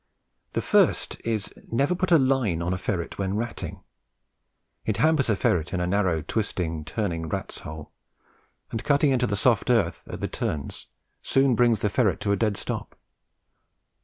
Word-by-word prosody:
The - - -1
first - - +3
is, 110 -3 -2 0.2
never 140 +9 +2
put 185 +1 -1
a 170 - +8
line 130 - +2
on 90 +2 0
a - - -1
ferret 90 -3 -3
when 95 0 -1
ratting. 115 +2 -4 1.0
It 110 - -1
hampers 155 -5 +3
a 110 - +4
ferret 90 -3 0
in - - -1
a 90 - 0
narrow, 90 -4 +1
twisting, 85 -4 -2
turning 85 -1 -2
rat's - - -4
hole, 75 -1 -9 0.8
and 110 - -3
cutting 145 0 +3
into 125 -2 +2
the 100 - 0
soft 115 +1 +2
earth 110 -9 +2
at - - -6
the - - -1
turns 70 -2 -4 0.3
soon 135 -1 +3
brings 120 -3 +3
the 105 - +2
ferret 100 -7 +2
to 105 -1 0
a - - +4
dead 105 -2 0
stop. - - -4
105 Hz, 170 wpm, -26 LUFS, 90-125 Hz, 1.0 s, a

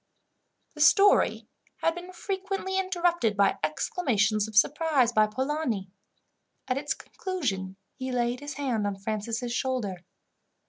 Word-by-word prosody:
The 300 - -7
story 395 +7 +5 0.4
had 330 - +3
been 350 +2 -8
frequently 385 +1 -3
interrupted 345 - +1
by 200 -1 +3
exclamations 215 - +1
of 220 - -10
surprise 290 +1 +3
by 215 -2 +4
Polani. 255 -5 -2 0.8
At 255 +1 0
its 295 +2 -2
conclusion, 215 - -4 0.2
he 260 -1 -5
laid 245 0 0
his 290 0 -7
hand 245 -7 -1
on 200 -1 -3
Francis' 220 +4 -3
shoulder. 230 -10 -2
255 Hz, 125 wpm, -27 LUFS, 215-330 Hz, 0.8 s, story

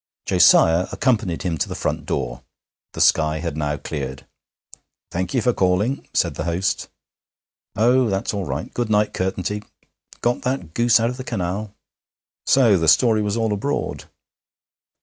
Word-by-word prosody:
Josiah 85 +3 +5
accompanied 110 -10 0
him 85 -4 -2
to - - -1
the - - -5
front - - -3
door. - - -3 0.5
The - - -3
sky 75 -1 +3
had 80 -1 -4
now 75 -1 -2
cleared. 65 -2 -6 0.9
'Thank 90 +8 -3
ye 125 - +2
for 125 +2 +2
calling,' 95 +9 0
said 85 -4 +1
the 80 - -5
host. 90 +2 -1 0.9
'Oh, 120 +2 +3
that's 95 +2 -2
all 100 -2 -3
right. - - -5
Good 120 -2 -2
night, 105 0 +2
Curtenty. 95 +2 -2 0.6
Got 120 +1 0
that 125 - -3
goose 120 +1 +4
out 115 +2 +1
of 125 - -8
the 130 - -6
canal?' 105 -2 -4 0.7
So 115 -8 +5
the 80 - 0
story 110 - +4
was 105 +1 -1
all 110 -2 0
abroad! 140 +8 -3
100 Hz, 155 wpm, -21 LUFS, 85-115 Hz, 0.9 s, Josiah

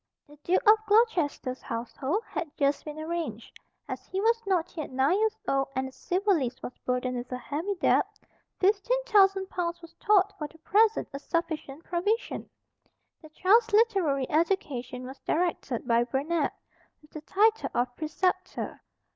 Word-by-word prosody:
The 295 - -16
Duke 345 +5 +1
of 430 +1 +8
Gloucester's 350 - +2
household 265 - -3
had 330 - -4
just 280 0 +1
been 300 0 -7
arranged. 310 -8 -5 0.3
As - - -6
he 380 - -3
was 455 +2 +2
not 355 -3 0
yet 310 -3 -4
nine 265 +6 +2
years 440 0 +1
old, 270 0 +1
and 260 0 -1
the - - -10
civil 385 +8 0
list 255 -5 -3
was 250 - -6
burdened 250 0 -1
with 245 +1 -6
a 250 - -2
heavy 305 +11 -3
debt, 350 - +3 0.5
fifteen 405 +5 +2
thousand 390 -4 +4
pounds 345 -1 -2
was 335 -1 -14
thought 405 -1 +4
for 300 - -3
the 320 - -19
present 430 +6 +2
a 275 - -4
sufficient 315 -2 -3
provision. 410 +7 -2 0.7
The 310 - -13
child's 435 +9 +3
literary 380 - +3
education 280 -7 -1
was 265 +2 -9
directed 315 -8 -1
by 235 0 +3
Burnet, 290 +5 0 0.5
with 300 - -21
the 310 - -8
title 430 +7 +2
of 245 0 0
Preceptor. 365 +5 -2
330 Hz, 160 wpm, -28 LUFS, 270-390 Hz, 0.7 s, of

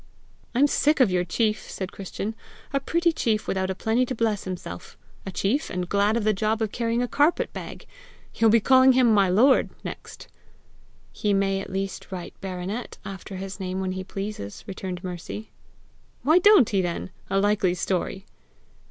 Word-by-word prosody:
"I'm 270 +4 +5
sick 295 +1 +2
of 245 -7 +5
your 180 -1 +2
chief!" 215 +5 -1
said 190 -1 -5
Christian. 200 +2 -5 0.4
"A 275 - +2
pretty 335 +5 +1
chief 220 -8 0
without 190 0 -1
a 190 - -2
penny 225 +5 +1
to 255 - -3
bless 220 -3 0
himself! 175 - -7 0.3
A - - -3
chief, 220 - 0
and 180 -1 -3
glad 205 +4 +2
of 230 - -1
the 215 0 +3
job 215 +2 0
of 215 - -2
carrying 235 0 0
a - - -1
carpet 295 +7 +2
bag! - - -8 0.5
You'll 225 - +4
be 230 +2 +6
calling 260 +3 +6
him 250 -3 +4
MY 200 -3 +4
LORD, 250 +9 +4
next!" - - -8 0.8
"He 205 -1 0
may 195 0 +1
at - - -8
least 195 +1 -4
write 180 -2 -6
BARONET 190 +5 -5
after 195 0 -7
his 190 +1 -6
name 185 0 -3
when 190 -1 -2
he 185 0 -4
pleases," 195 - -6
returned 185 -2 -6
Mercy. 180 +4 -6 0.7
"Why 315 +5 +5
don't 395 - +6
he 195 -3 +2
then? 175 +1 -3 0.2
A 195 - +1
likely 200 -3 +2
story!" 190 +2 -2
200 Hz, 180 wpm, -25 LUFS, 190-230 Hz, 0.8 s, be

